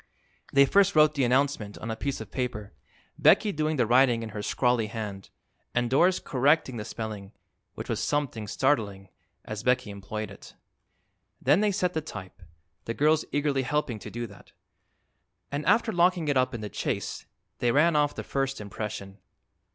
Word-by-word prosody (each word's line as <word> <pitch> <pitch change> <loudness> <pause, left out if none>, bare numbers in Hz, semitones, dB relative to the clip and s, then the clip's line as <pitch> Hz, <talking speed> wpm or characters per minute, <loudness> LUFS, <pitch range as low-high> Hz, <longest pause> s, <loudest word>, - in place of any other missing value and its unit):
They 140 0 +6
first 200 +6 +3
wrote 155 0 +6
the 140 -3 0
announcement 125 -4 +1
on 115 - -5
a - - -2
piece 140 +4 -3
of - - -9
paper, 120 -5 -4 0.5
Becky 215 - +5
doing 155 -2 -1
the 125 - +2
writing 120 0 +4
in 110 - -5
her 105 -1 -5
scrawly 120 +1 +1
hand 105 -3 -6 0.5
and 120 0 +1
Doris 175 +7 +4
correcting 135 -1 +1
the 105 - -5
spelling, 105 -3 -6 0.4
which - - -6
was - - -2
something 135 -8 -1
startling 100 -7 0 0.4
as 110 -1 -5
Becky 125 -2 +1
employed 100 +1 -6
it. 100 - -13 0.8
Then 145 +9 +3
they 210 -1 +3
set 180 -2 0
the 160 - -1
type, 100 - -9 0.4
the 115 - -3
girls 155 +2 +3
eagerly 145 -1 +1
helping 130 -4 -1
to - - -8
do 120 +1 -4
that, - - -15 1.0
and 145 +1 -2
after 230 -1 +3
locking 175 -3 +2
it 145 - +2
up 130 -1 +2
in 115 - -5
the 105 - -5
chase - - -3 0.3
they 120 - +2
ran 155 +5 +4
off 145 -1 +2
the - - -5
first 135 0 -2
impression. 100 -1 -6
125 Hz, 175 wpm, -27 LUFS, 110-150 Hz, 1.0 s, They